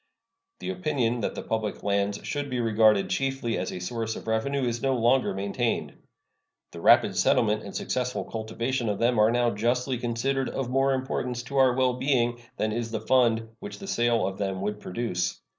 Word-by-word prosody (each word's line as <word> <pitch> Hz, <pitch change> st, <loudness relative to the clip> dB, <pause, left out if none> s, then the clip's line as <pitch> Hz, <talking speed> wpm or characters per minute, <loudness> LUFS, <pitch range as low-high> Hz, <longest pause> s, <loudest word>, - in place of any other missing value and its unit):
The -, -, -3 dB
opinion 145 Hz, -10 st, 0 dB
that 105 Hz, -, -2 dB
the -, -, -5 dB
public 110 Hz, -2 st, -3 dB
lands 100 Hz, 0 st, 0 dB
should 145 Hz, -1 st, -3 dB
be 125 Hz, -1 st, -2 dB
regarded 110 Hz, -3 st, +3 dB
chiefly 135 Hz, -4 st, -1 dB
as 90 Hz, -, -3 dB
a -, -, -5 dB
source 110 Hz, +4 st, -3 dB
of -, -, -8 dB
revenue 120 Hz, +5 st, 0 dB
is 120 Hz, -1 st, -1 dB
no 135 Hz, -1 st, +1 dB
longer 125 Hz, +2 st, +3 dB
maintained. 100 Hz, +5 st, -1 dB, 0.8 s
The -, -, -9 dB
rapid -, -, +5 dB
settlement -, -, +3 dB
and -, -, -9 dB
successful 125 Hz, 0 st, -2 dB
cultivation 115 Hz, +2 st, -2 dB
of 105 Hz, -, -1 dB
them 120 Hz, +1 st, +2 dB
are 105 Hz, +1 st, +6 dB
now 120 Hz, 0 st, +2 dB
justly 125 Hz, +4 st, 0 dB
considered 130 Hz, +3 st, -1 dB
of 130 Hz, -2 st, -3 dB
more 135 Hz, +1 st, +3 dB
importance 125 Hz, -2 st, -3 dB
to 140 Hz, +2 st, -5 dB
our 130 Hz, -2 st, +5 dB
well 130 Hz, -1 st, +2 dB
being 120 Hz, -2 st, 0 dB, 0.2 s
than 110 Hz, -, 0 dB
is 115 Hz, +1 st, -2 dB
the 110 Hz, -1 st, -3 dB
fund 115 Hz, -1 st, +2 dB
which 205 Hz, 0 st, -8 dB
the 195 Hz, -, -9 dB
sale 120 Hz, -, +1 dB
of 95 Hz, 0 st, -4 dB
them 95 Hz, -2 st, -2 dB
would 105 Hz, +1 st, -2 dB
produce. 90 Hz, -3 st, -2 dB
120 Hz, 190 wpm, -27 LUFS, 110-130 Hz, 0.8 s, are